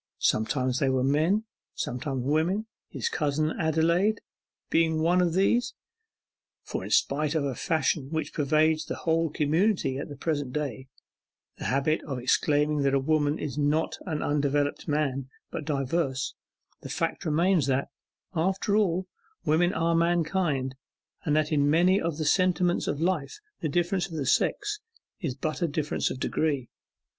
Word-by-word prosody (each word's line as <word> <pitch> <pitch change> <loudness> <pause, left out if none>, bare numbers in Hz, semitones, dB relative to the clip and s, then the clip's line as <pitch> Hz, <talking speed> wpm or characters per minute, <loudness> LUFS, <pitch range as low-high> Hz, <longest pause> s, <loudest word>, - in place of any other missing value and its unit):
Sometimes 130 +3 +1
they 135 - +2
were 130 -1 +1
men, 155 +10 +2 0.3
sometimes 130 +1 -3
women, 165 +9 +1 0.2
his - - -3
cousin 155 +1 0
Adelaide 170 +6 +2 0.5
being 160 -1 +3
one 175 +3 +3
of 175 -2 +1
these; 200 +7 +2 0.9
for - - -4
in - - -6
spite 150 +2 +2
of 155 - +1
a 135 - -1
fashion 155 -2 0
which 160 0 -3
pervades 155 +1 +2
the - - -4
whole 165 0 +1
community 155 -1 +1
at - - -5
the 145 - -7
present 145 -3 -2
day 135 -4 -3 0.7
the - - -6
habit 140 +4 +1
of 135 -3 -4
exclaiming 145 +4 +2
that 140 0 +3
woman 150 +1 +1
is 150 0 -4
not 150 +2 +1
undeveloped 145 -2 0
man, 140 -3 -1 0.2
but 150 - -5
diverse, 135 -2 -1 0.5
the - - -8
fact - - -2
remains 165 0 +2
that, 135 0 0 0.4
after 190 +4 0
all, 185 -3 +1 0.4
women 170 +3 +3
are 170 -3 +1
Mankind, 165 -5 +1 0.5
and 150 - +2
that 155 0 +1
in 145 -1 +3
many 180 +5 +4
of 165 -2 -2
the 155 - -2
sentiments 180 +1 +2
of 145 - -1
life 165 -5 -1 0.2
the 155 - -2
difference 175 +4 0
of 155 -5 -3
sex 415 - +1 0.4
is 155 -10 -3
but 155 +5 -3
a 170 - +2
difference 150 0 -1
of 130 - -5
degree. 140 -3 -1
155 Hz, 150 wpm, -27 LUFS, 140-170 Hz, 0.9 s, many